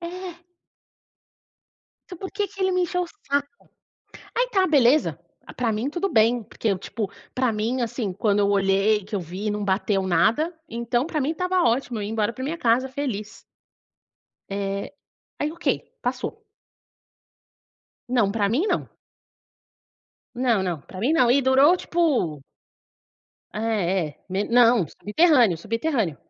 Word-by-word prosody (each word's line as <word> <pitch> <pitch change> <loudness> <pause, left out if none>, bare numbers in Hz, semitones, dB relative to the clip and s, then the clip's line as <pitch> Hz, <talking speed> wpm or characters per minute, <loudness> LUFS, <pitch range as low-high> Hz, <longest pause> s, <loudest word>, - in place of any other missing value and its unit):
É. 350 0 -7 1.7
Então, 360 - -7
por 380 - -7
que 405 0 -1
que 390 - -12
ele 375 0 +2
me 365 0 +2
encheu 360 +1 0
o 355 - -4
saco? 285 -7 -2 0.9
Aí - - +1
tá 385 -4 +3
beleza, 290 -2 +3 0.3
a - - -11
pra 235 -3 -1
mim 225 +7 -1
tudo 350 +5 -1
bem, 235 - +3
porque 220 +1 -3
eu, 195 - +1
tipo, 205 +1 -4 0.2
pra 255 -2 +2
mim, 225 +4 -1
assim, 225 -4 -2
quando 205 0 +1
eu 200 - +3
olhei, 200 +1 +2
que 210 +3 -15
eu 200 - +1
vi, 185 +5 -4
não 210 0 -3
bateu 195 +1 +1
nada, 300 - +2
então, 235 +3 -1
pra 315 -2 -2
mim 280 +3 0
estava 365 +2 0
ótimo, 240 0 +1
eu - - -3
ia 205 - -4
embora 220 0 0
pra 255 - -9
minha 310 +5 -3
casa 245 -1 +2
feliz. 250 -6 -5 1.1
Eh, 200 +5 -3 0.4
aí 295 - -1
ok, 340 - -15 0.4
passou. 440 - -4 1.6
Não, 235 -6 +2
pra 205 -2 +1
mim 275 - +1
não. - - -1 1.5
Não 240 -5 +1
não, 175 -5 -2
pra 185 - -10
mim 250 +8 +2
não, 290 -7 +4
e 275 +2 +4
durou, 270 +6 +5
tipo 290 - 0 1.1
É, 195 -5 0
é, 145 - -21
me 190 +2 -1
não, 235 -5 +4
subterrâneo, 235 - +3
subterrâneo. 230 - -1
235 Hz, 155 wpm, -24 LUFS, 205-305 Hz, 1.7 s, durou